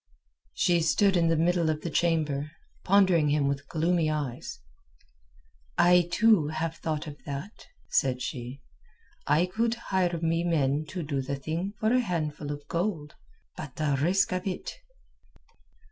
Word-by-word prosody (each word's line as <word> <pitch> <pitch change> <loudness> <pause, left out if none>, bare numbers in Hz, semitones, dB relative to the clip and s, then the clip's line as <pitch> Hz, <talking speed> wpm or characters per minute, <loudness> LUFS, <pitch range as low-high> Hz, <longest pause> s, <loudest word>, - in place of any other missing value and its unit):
She 175 -1 +2
stood 190 +5 +3
in 170 -1 +3
the 165 -1 +2
middle 170 0 +2
of 155 -1 -1
the 170 - -4
chamber, 155 -3 0 0.3
pondering 185 -6 +4
him 145 -1 +2
with 140 0 -3
gloomy 165 +1 +1
eyes 145 -5 -4 1.2
"I 175 0 +5
too 210 -5 +4
have 160 +1 -3
thought 155 -1 -3
of 150 -2 -10
that," 145 +9 -7 0.2
said 130 -2 +1
she. 125 0 -6 0.6
"I 150 +4 +4
could 225 +5 0 0.2
hire 175 -3 +1
me 165 +1 0
men 150 -3 +1
to 180 +1 -5
do 140 -2 -2
the 140 +2 -3
thing 165 +8 -4
for 220 +2 +2
a 255 - +4
handful 155 -8 -2
of 145 0 -7
gold. 170 -4 -2 0.4
But 140 -4 -8
the 150 -3 0
risk 185 +6 +2
of 185 +2 -3
it...." 185 - -4
160 Hz, 150 wpm, -28 LUFS, 145-180 Hz, 1.2 s, I